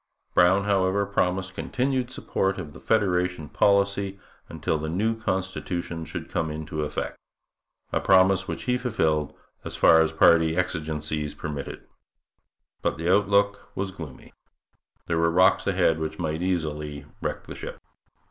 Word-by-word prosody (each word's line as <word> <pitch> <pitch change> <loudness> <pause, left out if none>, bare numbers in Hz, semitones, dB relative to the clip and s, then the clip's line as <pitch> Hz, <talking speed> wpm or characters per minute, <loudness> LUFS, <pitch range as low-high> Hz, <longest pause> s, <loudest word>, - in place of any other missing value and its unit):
Brown, 95 +3 +5
however, 100 0 +2
promised 95 -1 -1
continued 130 +4 -1
support 95 -6 -1
of 80 -6 -7
the 65 - -11
federation 90 -1 0
policy 100 -1 +2 0.3
until 80 - -2
the 80 +1 -3
new 110 +7 0
constitution 95 -5 -3
should - - -6
come 80 -1 -2
into 75 +1 -4
effect 75 0 -4 0.7
a - - +2
promise 95 0 +4
which 85 -1 -4
he 125 0 0
fulfilled 80 - 0 0.3
as - - -6
far 80 - +6
as 80 -1 +2
party 80 0 +4
exigencies 75 -4 -2
permitted. 75 -2 -6 1.0
But - - -1
the 85 +3 +2
outlook 100 0 +1
was 95 0 -2
gloomy. 80 -7 -10 0.7
There 80 -1 0
were 85 0 +3
rocks 90 +3 +4
ahead 90 -4 +2
which 80 0 -4
might 80 -1 -2
easily 75 -5 -2 0.2
wreck - - -3
the - - -8
ship. - - -8
90 Hz, 140 wpm, -25 LUFS, 80-100 Hz, 1.0 s, far